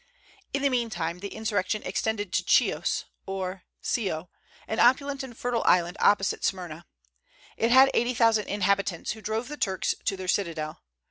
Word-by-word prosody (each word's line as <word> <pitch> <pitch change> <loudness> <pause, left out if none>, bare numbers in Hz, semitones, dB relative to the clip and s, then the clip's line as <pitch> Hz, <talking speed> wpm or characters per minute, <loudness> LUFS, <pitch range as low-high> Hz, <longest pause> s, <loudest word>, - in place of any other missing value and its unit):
In 275 - -1
the 280 - +4
meantime 200 -10 -2
the 200 - -5
insurrection 215 -1 -2
extended 205 +1 -2
to - - +2
Chios, - - +2 0.2
or 190 -1 -4 0.2
Scio, 180 -7 -2 0.4
an 220 - -2
opulent 275 +3 +3
and 250 -3 -9
fertile 245 -2 -1
island 175 0 +4
opposite 200 -2 +3
Smyrna. 175 -3 -3 0.7
It 230 - +1
had 265 +2 +7
eighty 240 +1 +1
thousand 225 -2 +3
inhabitants, 200 -3 0
who 220 - -7
drove 220 +3 -2
the 295 +2 -7
Turks 190 -7 0
to 195 - 0
their 185 -1 -6
citadel. 165 -5 -2
205 Hz, 155 wpm, -27 LUFS, 185-235 Hz, 0.7 s, had